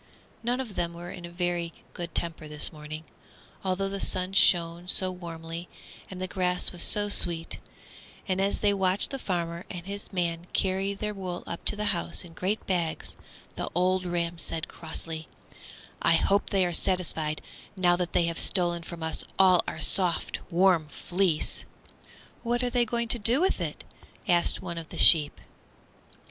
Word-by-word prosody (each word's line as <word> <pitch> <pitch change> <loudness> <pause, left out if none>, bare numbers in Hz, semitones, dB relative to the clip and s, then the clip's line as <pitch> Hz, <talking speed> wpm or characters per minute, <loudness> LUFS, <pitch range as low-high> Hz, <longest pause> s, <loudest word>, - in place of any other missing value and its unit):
None 245 +2 -1
of 245 -6 -5
them 170 -2 -3
were 175 +1 -8
in 175 -2 -9
a - - -9
very 175 -1 -2 0.2
good 175 -2 -7
temper 165 -2 -2
this 150 +1 -1
morning, 155 +1 -8 0.6
although 190 +1 -1
the 195 0 -4
sun 185 0 0
shone 175 -2 +4
so 185 0 +4
warmly 170 -1 -8 0.4
and 185 - -9
the 185 - -3
grass 180 -1 +2
was 175 - -3
so 205 +3 +3
sweet, 170 -5 +4 0.7
and 190 0 0
as 200 +1 0
they 205 - +4
watched 190 0 +2
the 270 - -4
farmer 170 -4 -3
and 175 -2 -7
his 200 +1 -7
man 175 -2 -2
carry 195 +1 0
their 210 +1 -4
wool 185 -3 -6
up 170 - -7
to - - +4
the 210 0 -3
house 170 - -3
in 165 - -13
great 190 +6 -3
bags, 170 -4 -2 0.4
the - - -4
old 185 +1 +1
ram 170 -1 -2
said, 165 -1 -3
crossly, 160 -1 -5 0.7
"I 165 - +4
hope 200 +4 +2
they 195 -2 +2
are 175 - -1
satisfied, 165 -4 0 0.4
now 180 -2 +3
that 175 -1 -3
they - - +3
have 170 0 -2
stolen 175 -2 +1
from 165 0 -8
us 160 - -1
all 185 -2 +5
our - - -5
soft, 175 +2 +3
warm 175 -3 +3
fleece." 175 0 -1 0.8
"What 240 +1 -1
are 245 - -1
they 245 -1 +2
going 235 +1 -2
to 240 - +2
do 230 +6 +3
with 375 +3 0
it?" - - -5 0.4
asked 175 0 +2
one 170 -2 -5
of 160 - -11
the - - -9
sheep. 150 -3 +9
180 Hz, 175 wpm, -27 LUFS, 170-195 Hz, 0.8 s, sheep